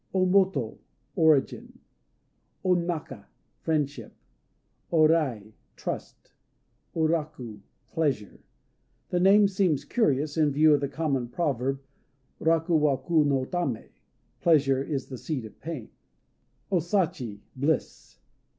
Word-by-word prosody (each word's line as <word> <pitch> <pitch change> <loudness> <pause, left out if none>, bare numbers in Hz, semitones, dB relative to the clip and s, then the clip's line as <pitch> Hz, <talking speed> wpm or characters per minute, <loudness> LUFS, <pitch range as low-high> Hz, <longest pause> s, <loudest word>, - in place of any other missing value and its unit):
O 185 -1 +3
Moto 185 - +2 0.4
"Origin." 155 -4 +2 0.9
O 185 - +3
Naka 165 - -3 0.3
"Friendship." 150 -3 -2 0.8
O 160 -2 +5
Rai 130 -10 0 0.2
"Trust." - - -7 0.6
O 165 - 0
Raku 150 -9 -3 0.3
"Pleasure." 140 -10 -2 0.7
The 180 - 0
name 200 +3 +6
seems 185 -7 0
curious, 150 - 0
in 155 -2 +4
view 150 +2 +5
of 145 - +2
the 140 - -1
common 140 -5 -1
proverb, 135 -1 -1 0.6
Raku 165 0 +2
wa 145 -3 +2
ku 165 0 +2
no 135 -2 +1
tané, 140 -9 -3 0.5
"Pleasure 135 -5 +3
is 140 -2 -3
the 130 -3 -8
seed 140 -8 -4
of 110 - -13
pain." 150 -7 -7 0.8
O 190 - +3
Sachi 165 - -1
"Bliss." 140 +3 -2
150 Hz, 115 wpm, -27 LUFS, 135-170 Hz, 0.9 s, name